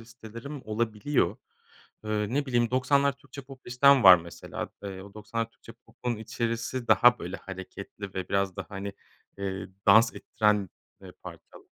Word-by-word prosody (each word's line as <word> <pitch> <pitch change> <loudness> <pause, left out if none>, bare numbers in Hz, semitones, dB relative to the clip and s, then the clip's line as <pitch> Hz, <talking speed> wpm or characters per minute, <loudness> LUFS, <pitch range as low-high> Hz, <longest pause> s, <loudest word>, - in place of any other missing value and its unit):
listelerim 115 +4 -10
olabiliyor. 110 +5 0 0.7
Iıı, 105 +1 -1
ne 145 +1 0
bileyim 120 -3 +1
90'lar 140 +2 +3
Türkçe 140 0 -12
pop 135 0 -14
listem 135 +2 +5
var 95 -1 +11
mesela. 85 0 -7
Eee, 95 -2 -6
o 100 +1 -14
90'lar 115 +2 -4
Türkçe 115 - -15
popun 120 0 -6
içerisi 115 +2 -3
daha 125 0 +6
böyle 90 +3 -5
hareketli 95 +1 -9
ve 95 -1 -4
biraz 100 -2 0
da, - - -5
hani, 100 0 -6 0.5
eee, 95 -1 -4 0.2
dans 110 +3 +6
ettiren, 105 -4 0 0.3
eee, - - -11
parçal - - -12
115 Hz, 150 wpm, -28 LUFS, 100-125 Hz, 0.7 s, var